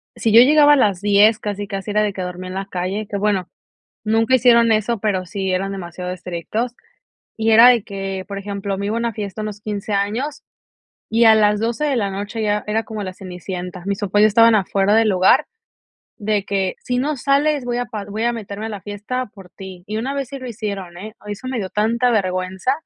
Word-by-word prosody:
Si 225 - 0
yo 230 - +10
llegaba 295 +2 +6
a - - +6
las 205 -9 +2
10, 205 +1 +4
casi, 205 -1 -4
casi 195 +1 -5
era 210 +1 +2
de 210 -1 +1
que 190 - -6
dormía 180 0 -6
en 185 - -7
la 195 +1 -3
calle, 195 +3 -3
que 200 - -3
bueno, 195 -3 0 0.6
nunca 225 +4 +2
hicieron 235 -2 +5
eso, 215 +1 +1
pero 195 -4 -1
sí 190 0 -4
eran 195 +2 -1
demasiado 180 -1 -6
estrictos, 185 +7 -4 0.6
y 225 0 +1
era 230 +2 +9
de 240 -4 +5
que, 195 -1 -5
por 200 -1 -6
ejemplo, 200 0 -4
me 200 +1 -3
iba 220 - -1
a - - 0
una 235 -1 -2
fiesta 205 0 -5
a - - -4
unos 210 -1 -6
15 210 0 -4
años 225 +9 -2 0.7
y 230 +1 +3
a 220 -1 +8
las 210 -1 +3
12 235 +6 -1
de 280 -3 +1
la 200 -4 0
noche 205 +4 -5
ya 210 -1 0
era 220 +1 0
como 215 -2 -6
la 185 -1 -5
Cenicienta. 180 -1 -7
Mis 200 -1 -2
papás 205 +1 +2
estaban 230 +1 +6
afuera 195 0 +1
del 225 -1 +4
lugar 185 -1 +4 0.7
de 210 -2 -1
que: 195 -2 -1
"Si 250 0 -2
no 295 +3 -1
sales 280 +1 +1
voy 240 0 -2
a 245 - -1
pa 210 -2 -6
voy 205 +3 -5
a 240 - +1
meterme 215 -2 -6
a - - -4
la 205 -3 -6
fiesta 210 +6 -4
por 190 -3 -14
ti". 190 -2 -11
Y 215 +1 -4
una 260 +5 -2
vez 275 -3 -3
sí 275 - -7
lo 255 - -8
hicieron, 200 -6 -5
¿eh? 215 +4 -9
Ay 210 - -7
eso 235 +6 -7
me 255 -3 -2
dio 190 - -3
tanta 230 +5 +1
vergüenza 185 +2 0
210 Hz, 230 wpm, -20 LUFS, 195-230 Hz, 0.7 s, yo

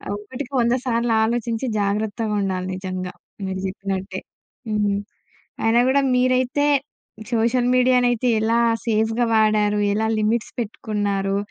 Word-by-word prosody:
ఒకటికి 250 +6 -7
వంద 235 +1 +2
సార్లు 235 -1 +1
ఆలోచించి 235 +1 -1 0.2
జాగ్రత్తగా 210 +2 -1
ఉండాలి 185 -2 -2
నిజంగా. 185 -1 -5 0.3
మీరు 190 0 -3
చెప్పినట్టే. 195 0 -4 0.5
హ్మ్. 205 -2 +1 0.7
అయినా 230 +2 +4
కూడా 280 +1 +3
మీరైతే 255 +3 +2 0.7
సోషల్ 235 +2 +2
మీడియానైతే 250 -1 +3
ఎలా 230 +2 +2 0.3
సేఫ్‌గా 225 +2 +1
వాడారు, 210 -1 +3
ఎలా 220 +1 0
లిమిట్స్ 220 +2 0
పెట్టుకున్నారు 205 -3 -2
220 Hz, 110 wpm, -22 LUFS, 205-240 Hz, 0.7 s, అయినా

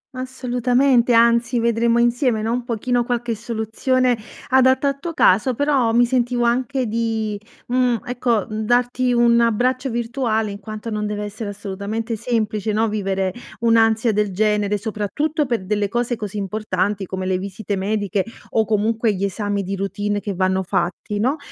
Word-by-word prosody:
Assolutamente, 250 0 +1
anzi 235 +1 +4
vedremo 235 0 +2
insieme, 240 -1 +2
no, 225 - -1
un 245 +1 -1
pochino 240 +1 0
qualche 240 -1 -2
soluzione 235 +3 0 0.3
adatta 260 +2 +4
a - - 0
tuo 335 +5 -6
caso 220 +7 +4
però 275 -4 +2
mi 240 +1 +4
sentivo 245 -1 0
anche 255 +2 0
di, 220 -2 -2 0.3
mhmm, 250 -1 +2
ecco, 245 -3 0
mhmm, 215 0 -5
darti 245 +2 +1
un 235 -1 +4
abbraccio 250 +4 +1
virtuale 230 -2 -1
in 200 - -7
quanto 215 +2 -7
non 210 -1 -2
deve 210 0 -3
essere 210 +1 -5
assolutamente 205 +3 -4
semplice, 215 -2 -1
no, 225 +1 +2
vivere 195 -3 -1 0.3
un'ansia 225 0 +3
del 210 -1 0
genere 210 +1 +1
soprattutto 245 - -2
per 230 -6 -1
delle 205 0 0
cose 240 +2 -1
così 210 -2 -6
importanti 200 -1 -2
come 190 0 -4
le 185 0 0
visite 200 +1 -4
mediche 200 0 -1 0.3
o 220 -1 +1
comunque 220 0 +1
gli 190 - -3
esami 200 +1 -1
di 195 +1 -3
routine 205 +1 -2
che 200 -2 -4
vanno 185 0 +1
fatti, 185 +3 -2
no. 255 +9 +1
225 Hz, 160 wpm, -21 LUFS, 205-245 Hz, 0.3 s, anzi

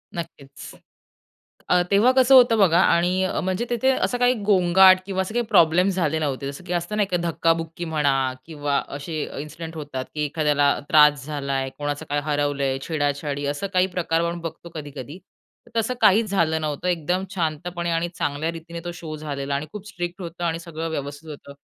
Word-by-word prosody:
नक्कीच. 150 -5 -8 0.9
अ, - - +4 0.2
तेव्हा 210 +6 +5
कसं 260 +1 +6
होतं 240 -3 +7
बघा 175 -4 +5
आणि 180 +2 +2 0.2
म्हणजे 185 +5 -1
तिथे 245 +2 +1
असं 255 -1 0
काही 245 0 +4
गोंगाट 185 -1 +6
किंवा 190 -1 -1
असं 190 +3 -5
काही 240 0 0
प्रॉब्लेम 170 +4 +4
झाले 165 -5 0
नव्हते, 140 -2 -2
जसं 140 - -11
की 180 - -3
असतं 175 +4 -2
नाही 205 -2 +2
का, 180 - +2
धक्काबुक्की 165 0 -1
म्हणा 135 -4 +1
किंवा 145 -3 -1 0.2
असे 155 +2 -5 0.2
इन्सिडेंट 160 +2 -8
होतात, 145 -4 -5
की 150 - -1
एखाद्याला 150 -1 +1 0.2
त्रास 150 -4 +5
झाला 140 -2 -3
आहे, 135 0 -1
कोणाचं 145 0 -3
काय 145 0 +1
हरवलंय, 145 -2 0
छेडा-छाडी 145 -2 -1
असं 145 +7 -4
काही 185 0 +3
प्रकार 165 -2 +1
आपण 170 0 -2
बघतो 165 +1 -7
कधी-कधी. 145 +1 -8 0.6
तसं 225 +3 +1
काहीच 215 +2 +5
झालं 160 -5 +1
नव्हतं 150 +2 -3
एकदम 180 +1 0
शांतपणे 175 0 -3
आणि 165 +1 0
चांगल्या 145 +2 -2
रीतीने 170 0 -8
तो 175 - -3
शो 160 -2 -7
झालेला 140 -2 -4
आणि 140 +2 -2
खूप 210 -1 -8
स्ट्रिक्ट 175 -1 -5
होतं 175 0 -7
आणि 165 -1 -1
सगळं 165 -1 -5
व्यवस्थित 145 0 -6
होतं 140 -1 -10
165 Hz, 175 wpm, -23 LUFS, 145-180 Hz, 0.9 s, होतं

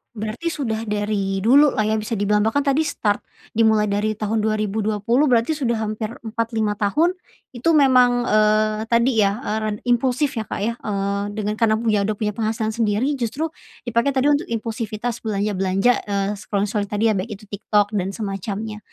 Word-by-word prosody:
berarti 215 +10 -4
sudah 245 -9 -2
dari 205 -2 -1
dulu 280 +6 +6
lah 215 - +2
ya 215 +1 +1
bisa 220 +2 -3
dibilang, 210 +1 +2
bahkan 225 +7 +1
tadi 280 +3 +2
start 220 -9 0 0.4
dimulai 220 -1 +4
dari 210 +1 -1
tahun 220 +1 -1
2020 215 +4 +1
berarti 235 +3 +3
sudah 240 -6 0
hampir 215 0 -3
4, 230 0 -2
5, 215 -2 +1
tahun. 295 - +1 0.4
Itu 245 +8 +1
memang, 250 -3 +4
eee, 215 0 +3
tadi 235 +3 +4
ya, 195 - +3
eee, 215 -2 -1
ren 215 -1 -1
impulsif 255 +3 +1
ya, - - -2
Kak, - - -3
ya, 230 +2 0
eee, 200 -1 -2
dengan 210 -1 -2
karena 220 -1 +2
punya 220 -3 +1
udah 210 +1 -1
punya 210 -1 -1
penghasilan 220 0 -1
sendiri 230 +5 +1
justru 265 +6 -2 0.4
dipakai 235 +3 +1 0.2
untuk 295 +4 +2
impulsivitas 230 0 -3
belanja-belanja, 200 0 +1 0.2
eee, 200 -1 0
scroll-scrolling 205 0 -2
tadi 210 +1 -1
ya, - - +1
baik 195 +4 -3
itu 210 +1 -8
TikTok 205 +1 0
dan 190 -1 -1
semacamnya. 210 +1 -4
215 Hz, 170 wpm, -21 LUFS, 205-235 Hz, 0.4 s, dulu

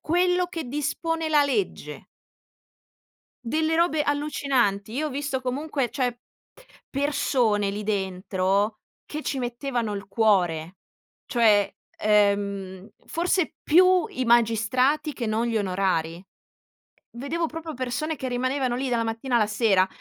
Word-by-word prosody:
quello 360 +2 +2
che 335 -2 -5
dispone 310 +4 -2
la 300 -2 +4
legge." 285 +8 -3 1.4
Delle 315 +6 0
robe 330 -2 +2
allucinanti. 275 -8 0
Io 295 +6 -1
ho 300 - -4
visto, 280 -1 -2
comunque 270 +1 -2
cioè 245 -3 -1 0.7
persone 255 -7 +1
lì 205 +1 -4
dentro, 195 +1 -1 0.3
che 305 0 -6
ci 275 - -2
mettevano 245 -2 -2
il 200 0 -6
cuore, 185 -6 +1 0.5
cioè, 215 -5 +3 0.3
ehm, 200 -2 +1 0.2
forse 345 0 0
più 365 +1 +5
i 255 - -3
magistrati, 240 +6 +2
che 240 - -4
non 220 +2 0
gli 230 -1 -1
onorari. 180 -3 -1 0.9
Vedevo 310 +7 -2
proprio 320 0 -7
persone, 260 +5 -3
che 260 - -4
rimanevano 255 0 -1
lì 265 +2 -2
dalla 235 -2 0
mattina 230 +3 -1
alla 215 - +3
sera, 205 -3 +3
245 Hz, 125 wpm, -25 LUFS, 210-295 Hz, 1.4 s, più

